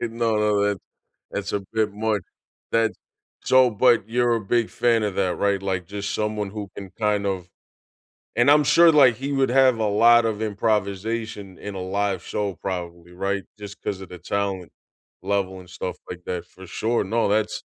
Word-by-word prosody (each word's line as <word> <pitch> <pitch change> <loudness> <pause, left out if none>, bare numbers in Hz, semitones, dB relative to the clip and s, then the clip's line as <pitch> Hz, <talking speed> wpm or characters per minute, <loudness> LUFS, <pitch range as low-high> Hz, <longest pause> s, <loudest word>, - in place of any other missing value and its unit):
No, 115 -1 0
no, 105 -1 +2
that's 105 -2 0 0.5
that's 100 0 -4
a 100 - 0
bit 110 -2 +1
much, 105 -1 -1 0.5
that 115 -1 +2 0.5
So, 130 -1 +5
but 115 0 +3
you're 120 0 +2
a - - -2
big 115 +3 0
fan 115 -2 +2
of 105 -3 -1
that, 95 -2 0
right? 100 -1 +1
Like, 95 -3 -2
just 100 +1 -4
someone 105 -1 -2
who 105 -1 -6
can 95 -2 -8
kind 105 -2 +1
of 95 -3 -3 0.9
And 120 +4 +4
I'm 150 0 +6
sure, 170 +3 +6
like, 135 -6 +6
he 140 +2 -4
would 135 -2 +2
have 130 -1 +4
a 110 - +1
lot 115 +3 +5
of 110 -1 -2
improvisation 105 -1 -2
in 105 -1 -7
a 95 - -4
live 95 -1 -1
show 100 -2 -2
probably, 85 -2 -6
right? 100 +2 -2 0.2
Just 105 0 -9
'cause 100 -2 -3
of 95 - -8
the 90 - -9
talent 100 -1 -3 0.5
level 95 -1 -1
and 90 - -14
stuff 90 0 -5
like 90 -1 -7
that, 90 -2 -4
for 95 +1 -14
sure. 115 +6 0
No, 115 +4 0
that's 105 0 0
105 Hz, 185 wpm, -23 LUFS, 95-115 Hz, 0.9 s, I'm